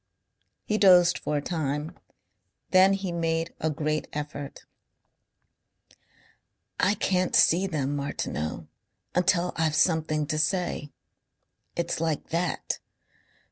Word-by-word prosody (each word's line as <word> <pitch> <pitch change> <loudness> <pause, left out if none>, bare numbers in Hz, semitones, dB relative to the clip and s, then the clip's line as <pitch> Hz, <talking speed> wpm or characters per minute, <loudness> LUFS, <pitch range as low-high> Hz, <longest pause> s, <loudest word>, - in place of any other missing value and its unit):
He 215 0 0
dozed 180 -3 +6
for 150 - -2
a 145 - -3
time. 150 -2 -2 0.8
Then 190 +1 +6
he 195 -2 -2
made 165 -1 -1
a 160 - 0
great 155 +1 -2
effort. 145 -1 -6 2.1
"I 200 +3 +3
can't 185 -2 0
see 180 +4 +4
them, 145 -5 -2
Martineau, 110 - -3 0.5
until 180 0 +2
I've 160 -2 +1
something 155 -2 +2
to 155 +1 -2
say. 160 -2 -1 0.9
It's 170 -1 -2
like 160 -3 -2
that. 170 +1 -2
165 Hz, 105 wpm, -27 LUFS, 150-180 Hz, 2.1 s, dozed